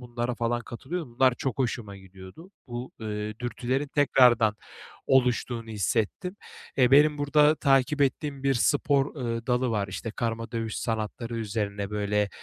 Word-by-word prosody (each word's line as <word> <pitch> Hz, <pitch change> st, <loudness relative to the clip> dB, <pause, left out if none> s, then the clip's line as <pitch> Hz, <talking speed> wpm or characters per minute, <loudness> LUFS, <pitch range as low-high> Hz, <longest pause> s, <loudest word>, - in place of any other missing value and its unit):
bunlara 120 Hz, 0 st, -3 dB
falan 120 Hz, 0 st, -1 dB
katılıyordum. 125 Hz, +3 st, -6 dB
Bunlar 130 Hz, 0 st, +4 dB
çok 135 Hz, +1 st, -3 dB
hoşuma 120 Hz, -6 st, -2 dB
gidiyordu. 95 Hz, -, -13 dB, 0.2 s
Bu, 120 Hz, +1 st, -6 dB
ııı, 105 Hz, -1 st, -4 dB
dürtülerin 125 Hz, +3 st, -2 dB
tekrardan 125 Hz, -7 st, +4 dB, 0.5 s
oluştuğunu 125 Hz, -3 st, +1 dB
hissettim. 110 Hz, -, -1 dB, 0.4 s
Eee, 125 Hz, -1 st, +4 dB
benim 150 Hz, +1 st, +5 dB
burada 150 Hz, +1 st, +4 dB
takip 135 Hz, +1 st, +2 dB
ettiğim 140 Hz, 0 st, -1 dB
bir 135 Hz, -1 st, +2 dB
spor, 140 Hz, +3 st, +2 dB
ııı, 115 Hz, -3 st, -3 dB
dalı 125 Hz, 0 st, +1 dB
var. 105 Hz, -3 st, -1 dB
İşte, 105 Hz, +4 st, -5 dB
karma 115 Hz, 0 st, -3 dB
dövüş 115 Hz, -2 st, -3 dB
sanatları 115 Hz, +1 st, -3 dB
üzerine, 105 Hz, -2 st, -3 dB
böyle, 105 Hz, 0 st, 0 dB
120 Hz, 140 wpm, -27 LUFS, 110-135 Hz, 0.5 s, benim